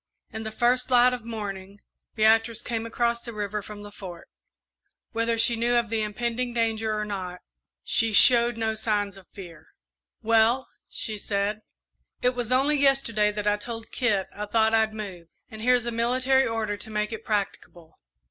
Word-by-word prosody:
In 220 - -5
the 220 - -4
first 245 +3 +1
light 250 0 +5
of 240 -3 -6
morning, 200 -3 -6 0.4
Beatrice 225 +1 +3
came 230 -1 -3
across 235 0 0
the 235 - -8
river 210 0 -3
from 205 0 -10
the 205 - -10
Fort. 180 -3 -10 0.8
Whether 230 0 0
she 235 +1 +3
knew 235 +1 +1
of 235 -2 +1
the 225 -1 0
impending 235 +3 -3
danger 225 -2 0
or 210 - -2
not, 185 -3 -6 0.4
she 225 0 +2
showed 235 +2 +6
no 220 -1 -1
signs 205 -2 -1
of 195 -2 -15
fear. 175 -5 -12 0.6
"Well," 230 +3 +3 0.2
she 215 -2 0
said, 205 +1 -2 0.6
"it 250 +1 +3
was 245 -1 -4
only 275 +4 +3
yesterday 270 -7 +3
that 210 0 -4
I 205 0 +3
told 225 +1 -7
Kit 210 -7 0
I 210 0 -5
thought 220 +1 +2
I'd 220 -1 +3
move, 190 -6 -7 0.2
and 220 -1 -9
here's 250 0 +3
a 235 - -2
military 255 +3 +2
order 220 -2 -2
to 215 +2 -8
make 210 +1 -2
it 225 0 -7
practicable. 180 -5 -4
220 Hz, 175 wpm, -25 LUFS, 210-235 Hz, 0.8 s, showed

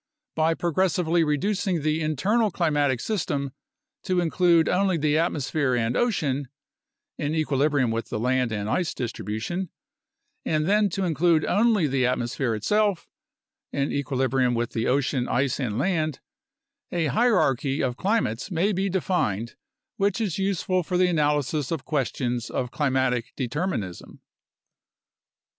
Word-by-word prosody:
By 160 +1 +2
progressively 175 0 +1
reducing 180 +2 0
the 155 +1 +1
internal 195 - +1
climatic 145 -8 +1
system 145 - -2 0.5
to 185 -2 0
include 170 -1 +3
only 190 -1 +2
the 150 -1 +1
atmosphere 150 -4 0
and 120 0 0
ocean 145 - 0 0.7
(in 150 +2 -1
equilibrium 145 -4 +1
with 115 +1 -3
the - - -2
land 125 0 +1
and 105 -1 -3
ice 170 +8 -1
distribution 115 - -4 0.4
), - - -52
and 155 -1 0
then 205 +2 +3
to 195 +2 -2
include 165 -1 +2
only 220 -5 +3
the 135 -3 +1
atmosphere 120 -1 -1
itself 205 - +1 0.6
(in 140 0 -1
equilibrium 130 -2 0
with 120 0 -1
the 115 - -1
ocean, 130 -1 +1
ice, 135 +1 0
and 115 -6 -2
land), 155 -4 0 0.7
a 170 -2 0
hierarchy 150 - +2
of 125 -2 -1
climates 195 - -1
may 185 +3 +1
be 195 +1 0
defined 155 - -1 0.4
which 200 -1 +1
is 200 -5 -2
useful 190 -1 0
for 180 +1 -2
the 180 0 +4
analysis 150 -3 0
of 160 -5 -3
questions 125 -4 -2
of 125 -1 -3
climatic 130 -4 0
determinism. 130 - -4
150 Hz, 135 wpm, -25 LUFS, 130-180 Hz, 0.7 s, the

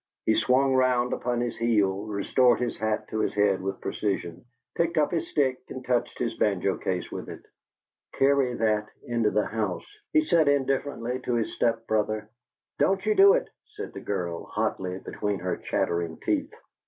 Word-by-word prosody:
He 110 - +4
swung 130 +5 +3
round 125 -1 +2
upon 120 -1 -1
his 120 -1 -2
heel, 105 -3 +1
restored 120 +4 +3
his 120 -1 -1
hat 110 0 -2
to 110 - -2
his 110 - 0
head 100 -2 +2
with 95 0 -4
precision, 90 -3 -3 0.3
picked 170 0 0
up 150 -1 +3
his 170 -2 -1
stick 130 -3 +1
and 130 -1 -7
touched 125 -1 0
his 115 -2 -1
banjo 100 -2 +1
case 90 -1 -3
with - - -6
it. - - -9 0.7
"Carry 135 -2 +3
that 110 -2 +1
into 115 -3 +1
the 105 +1 +1
house," 105 -4 -3 0.3
he 310 -2 +4
said, 165 - +3
indifferently, 135 -3 0
to 125 -1 -2
his 115 -2 -1
step 115 -1 0
brother. 110 0 -1 0.5
"Don't 195 0 +2
you 430 - +3
do 400 0 +7
it!" - - -1 0.2
said 430 0 -8
the - - -7
girl, 90 -4 -3
hotly, 95 -1 -2
between 105 +1 -3
her 90 0 -2
chattering 85 -1 -1
teeth. - - -1
115 Hz, 175 wpm, -27 LUFS, 100-130 Hz, 0.7 s, do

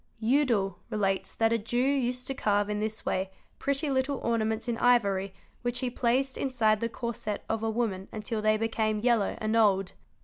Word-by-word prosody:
Hudel 220 -6 +1
relates 195 -2 0
that 225 0 +2
a 230 - +2
Jew 230 +3 -3
used 250 -1 +1
to 270 - -2
carve 205 -4 +1
in 210 - -1
this 215 +1 -3
way 190 +1 -1 0.3
pretty 280 +2 0
little 265 +1 0
ornaments 220 -1 0
in 235 - 0
ivory 200 -6 +3 0.3
which 245 0 -1
he 250 -1 -1
placed 255 +2 0
inside 225 -5 +2
the 230 - -1
corset 230 -3 -4
of 225 -1 -1
a 225 - 0
woman 215 -4 -2
until 215 +1 -3
they 215 0 +3
became 220 -1 0
yellow 225 -2 +2
and 215 +1 -1
old. 195 -4 +3
225 Hz, 180 wpm, -29 LUFS, 210-245 Hz, 0.3 s, ivory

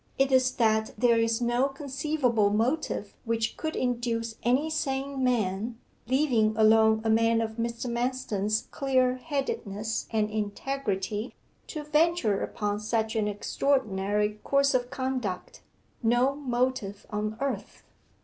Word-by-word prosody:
It 270 0 +2
is 255 -1 +4
that 220 -2 +1
there 235 0 +4
is 230 +1 +1
no 240 +3 +2
conceivable 270 -5 0
motive 225 0 -1
which 225 -1 -1
could 315 0 -4
induce 235 -2 -1
any 255 +6 +2
sane 275 -3 -2
man 225 -2 0 0.3
leaving 240 -5 +2
alone 220 0 +5
a 225 - 0
man 225 +1 +3
of 220 0 -3
Mr. 235 +1 -3
Manston's 235 -4 -1
clear 255 -2 +1
headedness 230 -7 -3
and 215 -2 +1
integrity 210 0 -3 0.3
to 305 -2 -5
venture 300 - +2
upon 205 -1 -2
such 220 +1 -1
an 215 -2 +1
extraordinary 210 -2 0
course 275 0 +3
of 245 -1 0
conduct 260 - -3 0.4
no 245 +3 +3
motive 250 -7 -2
on 215 +1 -2
earth. 275 0 -4
235 Hz, 125 wpm, -28 LUFS, 215-265 Hz, 0.4 s, alone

